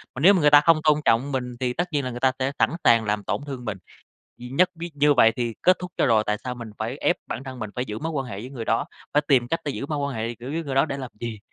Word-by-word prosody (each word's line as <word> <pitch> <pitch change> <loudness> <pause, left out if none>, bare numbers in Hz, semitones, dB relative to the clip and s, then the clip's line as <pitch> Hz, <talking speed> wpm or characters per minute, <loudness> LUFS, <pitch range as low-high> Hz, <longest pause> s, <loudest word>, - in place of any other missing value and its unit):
Mà - - -5
nếu 190 +6 +7
mà 185 - +2
người 150 - +6
ta 145 0 +8
không 165 +1 +5
tôn 150 -1 +4
trọng 125 +5 +2
mình 125 -2 -3
thì 125 -1 -1
tất 175 +6 -1
nhiên 145 -3 0
là 125 - -3
người 120 - -6
ta 130 +1 +3
sẽ 130 +1 0
sẵn - - +4
sàng 115 -1 +5
làm 105 0 -1
tổn - - -2
thương 130 -3 -6
mình. 105 -3 -3 0.6
Gì 125 - -8
nhất 180 +8 +3
biết 170 +1 -6
như 145 0 +4
vậy 115 -3 +5
thì 120 -2 -2
kết 185 0 +5
thúc 180 0 -7
cho - - +2
rồi, 110 -3 +4
tại 105 - +1
sao 125 -1 -3
mình 120 -2 -8
phải 115 +4 -3
ép 175 - +2
bản 135 - -5
thân 130 -2 -8
mình 110 -3 -5
phải 125 - -2
giữ 105 -3 -5
mối 160 +4 -4
quan 135 -3 -2
hệ 100 -5 -6
với 125 +4 -8
người 125 -4 -6
đó, - - 0 0.3
phải 150 - +4
tìm 125 -4 +3
cách 165 - -1
để 145 - -1
giữ 140 - -5
mối 150 0 -3
quan 140 -1 -2
hệ, 115 +1 -3
kiểu, 125 +3 -8
với 165 +3 -2
người 135 -2 -4
đó 135 - +4
để 140 -3 -4
làm 130 -3 -6
gì? 115 -2 -5
130 Hz, 330 wpm, -24 LUFS, 120-145 Hz, 0.6 s, ta